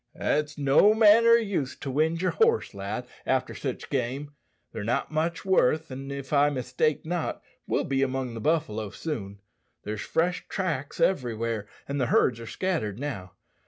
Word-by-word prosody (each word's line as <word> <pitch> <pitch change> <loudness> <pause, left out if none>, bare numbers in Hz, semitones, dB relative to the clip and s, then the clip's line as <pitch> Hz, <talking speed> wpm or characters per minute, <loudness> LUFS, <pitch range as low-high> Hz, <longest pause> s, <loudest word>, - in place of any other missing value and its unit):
"It's 150 0 -1
no 145 +10 +5
manner 225 +1 +7
o' - - +9
use 200 - -1
to 135 - -5
wind 160 +5 +1
yer 185 - +2
horse, 455 - +2
lad, 100 +5 -4 0.2
after 130 -1 0
sich 130 -3 -5
game. 135 +2 -2 0.4
They're 110 -2 -5
not 115 +7 -1
much 160 +3 -1
worth, 160 -4 +2
an', 135 +1 -6
if 140 0 -6
I 145 0 +5
mistake 130 +3 -1
not, 175 0 -3 0.2
we'll - - +1
be 135 -1 0
among 130 -2 -1
the 115 - -6
buffalo 110 -9 0
soon. 100 -9 -5 0.4
There's 105 0 -4
fresh 175 +2 -1
tracks 160 -8 -3
everywhere, 115 - 0 0.2
and 140 0 -2
the 125 - +1
herds 115 -1 +3
are 115 - -8
scattered 160 - -2
now. 115 -10 -5
140 Hz, 165 wpm, -27 LUFS, 120-165 Hz, 0.4 s, o